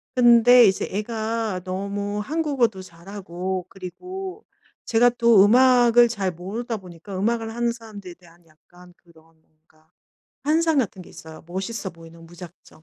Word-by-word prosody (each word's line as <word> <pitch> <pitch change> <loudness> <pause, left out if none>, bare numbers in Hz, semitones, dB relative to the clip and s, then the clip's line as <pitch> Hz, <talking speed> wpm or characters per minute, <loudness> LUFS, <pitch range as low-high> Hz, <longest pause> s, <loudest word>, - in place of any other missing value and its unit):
근데 245 0 +6
이제 190 -2 +1
애가 220 -1 -3
너무 200 +2 -4
한국어도 265 -6 -1
잘하고 185 0 -6
그리고 370 - -9 0.4
제가 240 +1 +4
또 230 -4 +6
음악을 240 +1 +5
잘 200 -5 -2
모르다 215 +7 -5
보니까 185 +1 -10
음악을 225 +2 -1
하는 235 0 -1
사람들에 210 -6 -11
대한 175 -1 -22
약간 175 +3 -20
그런 165 -2 -23 0.2
뭔가 155 0 -34 0.6
환상 320 +1 +2
같은 220 -8 -1
게 180 - -12
있어요 160 0 -12
멋있어 190 +3 -5
보이는 165 0 -15
무작정. 175 -2 -14
200 Hz, 305 characters per minute, -23 LUFS, 180-235 Hz, 0.6 s, 근데